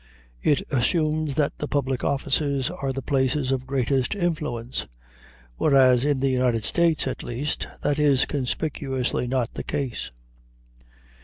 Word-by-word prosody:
It 145 - +2
assumes 155 +2 +1
that 150 -1 0
the 150 - -2
public 135 -3 -1
offices 140 -1 +1
are 135 -1 -3
the 135 0 -5
places 135 0 +1
of 130 -1 -2
greatest 135 - 0
influence; 150 - -2 0.7
whereas, 130 -4 +5
in 145 -2 +1
the 135 -1 +2
United 125 -3 +1
States, 170 -3 +2
at 130 - -3
least, 135 +5 -3 0.2
that 145 +1 +1
is 140 -3 +4
conspicuously 135 -2 -2
not 125 -2 -1
the - - -5
case. 140 -5 -3
135 Hz, 135 wpm, -24 LUFS, 130-150 Hz, 0.7 s, whereas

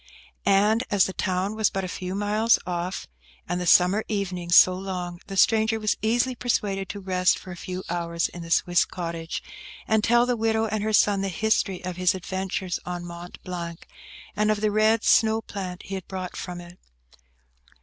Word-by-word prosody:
And 210 +4 +4
as 200 -4 +4
the 190 - -4
town 185 +2 -1
was 220 -1 +2
but 195 - -3
a - - -3
few 185 +1 -5
miles 210 +3 +3
off, 180 +1 -3 0.4
and 175 0 -2
the 180 - -3
summer 185 +5 +5
evenings 180 -4 -1
so 185 - +8
long, 180 -2 -5
the 195 - -6
stranger 220 +2 +3
was 215 -1 +1
easily 240 +4 +1
persuaded 200 -6 -1
to 205 - -5
rest 185 -1 +2
for 185 - -10
a - - -6
few 185 +1 -6
hours 170 -1 -1
in 175 - -10
the 165 - -8
Swiss 175 +1 +3
cottage, 165 -2 -5 0.4
and 220 -1 +2
tell 240 +2 +4
the 245 0 0
widow 225 0 +1
and 215 -1 -2
her 220 - 0
son 205 -1 +3
the 195 - -1
history 195 -1 0
of 180 -1 -5
his 180 0 +2
adventures 190 0 -3
on 175 -1 -5
Mont 175 +1 -9
Blanc, 170 -2 -6 0.5
and 210 0 +1
of 215 -1 +1
the 215 -1 +2
red 215 +1 +3
snow 220 0 +4
plant 190 -4 -6
he 195 - -8
had 190 -2 -5
brought 185 -2 -6
from 180 -1 -6
it. 175 +1 -14
190 Hz, 190 wpm, -25 LUFS, 180-215 Hz, 0.5 s, so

